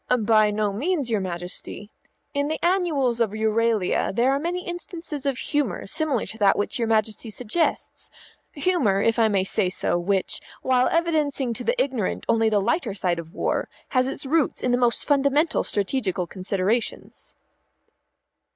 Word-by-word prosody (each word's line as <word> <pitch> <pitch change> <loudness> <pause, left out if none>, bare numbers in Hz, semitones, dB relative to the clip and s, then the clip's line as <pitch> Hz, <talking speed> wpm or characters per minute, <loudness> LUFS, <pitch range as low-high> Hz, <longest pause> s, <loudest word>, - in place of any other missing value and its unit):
"By 215 -1 +5
no 210 -1 0
means, 285 - -1
your 215 -3 +1
Majesty. 180 +3 -6 0.4
In 285 0 0
the 315 - -1
annuals 310 -10 +1
of 220 -3 +1
Euralia 220 -2 +1
there 240 +6 +2
are 275 - +1
many 350 +4 -3
instances 335 -4 -6
of 270 -2 0
humour 285 -10 -1
similar 295 0 -1
to 225 - -10
that 200 -2 +4
which 205 +5 -1
your 230 - 0
Majesty 220 +1 0
suggests: 250 +9 -2 0.4
humour, 275 - +1
if 230 0 +2
I 225 - +5
may 200 -3 +1
say 190 0 0
so, 175 -1 -1
which, 190 +2 0 0.2
while 255 -1 +3
evidencing 300 -7 0
to - - -5
the 480 +1 0
ignorant 255 - -1
only 225 -1 +3
the 215 - +2
lighter 230 - 0
side 180 -3 0
of 165 0 -10
war, - - -1 0.2
has 255 -1 +2
its 275 +1 -5
roots 305 +1 0
in 250 - +1
the 245 - +3
most 240 -1 +1
fundamental 285 +2 +2
strategical 200 -3 0
considerations." 195 +5 -3
235 Hz, 160 wpm, -24 LUFS, 205-285 Hz, 0.4 s, By